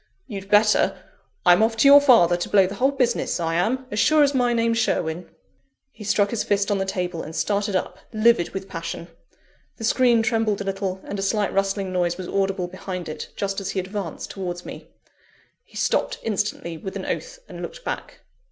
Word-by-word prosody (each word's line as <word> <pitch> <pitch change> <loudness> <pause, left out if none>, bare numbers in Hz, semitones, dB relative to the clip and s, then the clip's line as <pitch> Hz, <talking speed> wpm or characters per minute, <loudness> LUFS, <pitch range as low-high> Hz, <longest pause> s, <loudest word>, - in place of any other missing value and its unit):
You'd 200 -5 -8
better 210 +1 +4 0.5
I'm 180 +3 +6
off 225 0 +2
to 250 - +5
your 285 +1 +9
father 230 -11 +5
to 175 - -4
blow 195 -2 +5
the 190 - -4
whole 255 +6 +2
business; 250 -8 0
I 165 -1 -1
am, 230 +10 0
as 210 - -2
sure 310 +7 +5
as 285 0 +2
my 245 -2 +2
name's 230 -1 +1
Sherwin!" 170 -5 -1 0.6
He 220 - -12
struck 205 0 +1
his 225 -2 -1
fist 200 0 0
on 200 - +1
the 195 - 0
table, 180 -3 -3
and 160 - -8
started 205 +1 0
up, 185 0 -2
livid 215 -5 +3
with 195 0 -6
passion. 170 0 -6 0.7
The 225 - -8
screen 235 0 +3
trembled 225 -3 +1
a - - -3
little, 195 -1 -3
and 200 - -5
a - - -2
slight 205 +1 0
rustling 195 -1 -1
noise 175 -1 0
was 185 -2 -6
audible 195 -2 -1
behind 180 0 -6
it, 155 - -6
just 195 0 -2
as 195 - -4
he 195 - -2
advanced 190 -2 -5
towards 180 -2 -5
me. - - -9 0.8
He - - -14
stopped - - 0
instantly, 205 -6 -2
with 190 - -7
an - - -5
oath, - - -4
and - - -9
looked - - -8
back. - - -6
200 Hz, 200 wpm, -23 LUFS, 185-225 Hz, 0.8 s, your